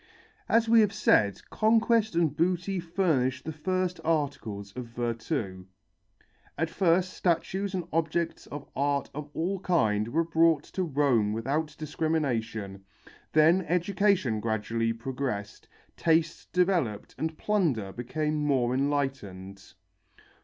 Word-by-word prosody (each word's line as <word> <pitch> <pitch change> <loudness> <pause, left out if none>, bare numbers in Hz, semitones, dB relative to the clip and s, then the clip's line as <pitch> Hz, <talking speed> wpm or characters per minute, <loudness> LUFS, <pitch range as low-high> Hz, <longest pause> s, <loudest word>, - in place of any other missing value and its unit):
As 230 0 +3
we 230 0 +6
have 210 -2 +3
said, 105 - +3
conquest 225 -2 +3
and 165 -4 +2
booty 180 +3 0
furnished 160 -8 0
the 160 - -3
first 185 +3 -2
articles 125 -11 -2
of 125 -1 -5
virtu. 115 - -3 0.9
At 160 +2 -1
first 180 +1 +2
statues 190 +3 -1
and 180 - -1
objects 165 +1 -1
of 145 -1 -8
art 140 0 0
of 150 0 -6
all 185 +4 -1
kinds 110 - +1
were 165 +6 +1
brought 165 -2 +3
to 190 - -1
Rome 135 - +2
without 150 +7 -2
discrimination, 120 -11 -2 0.5
then 160 +4 +5
education 180 - +1
gradually 115 +1 -1
progressed, 115 -3 -4 0.3
taste 160 -1 +1
developed 175 - 0
and 160 0 -2
plunder 155 - 0
became 150 +7 -2
more 130 -4 +2
enlightened. 120 -10 -3
150 Hz, 115 wpm, -28 LUFS, 115-175 Hz, 0.9 s, we